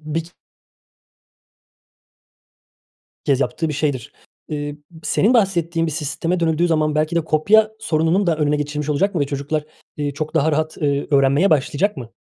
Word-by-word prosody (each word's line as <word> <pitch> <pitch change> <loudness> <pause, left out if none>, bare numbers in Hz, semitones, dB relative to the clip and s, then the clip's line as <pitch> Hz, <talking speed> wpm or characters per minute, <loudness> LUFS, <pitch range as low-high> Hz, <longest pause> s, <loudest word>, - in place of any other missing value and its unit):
1 155 +1 -3
k 165 - -16 2.9
kez 140 -2 +2
yaptığı 160 +3 -1
bir 150 - -3
şeydir. 140 -3 -2 0.4
Eee, 145 -1 -3
ı - - -12 0.3
senin 215 +9 +2
bahsettiğin 170 -6 +1
bir 160 - -3
sisteme 165 +4 -2
dönüldüğü 165 +1 +2
zaman, 155 -2 +1
belki 155 +2 0
de 165 - +1
kopya 210 +8 +4
sorununun 165 +1 +1
da 165 -2 +2
önüne 150 -1 +1
geçilmiş 150 0 -3
olacak 190 +8 +1
mı 170 - 0
ve 145 - +1
çocuklar, 145 +2 -2 0.3
iii, 145 -1 -3
çok 155 +1 -4
daha 155 +2 +2
rahat, 155 +1 -1
eee, 140 -2 0
öğrenmeye 140 +6 +4
başlayacak 155 +7 +1
mı? 115 -2 -8
155 Hz, 160 wpm, -20 LUFS, 145-165 Hz, 2.9 s, kopya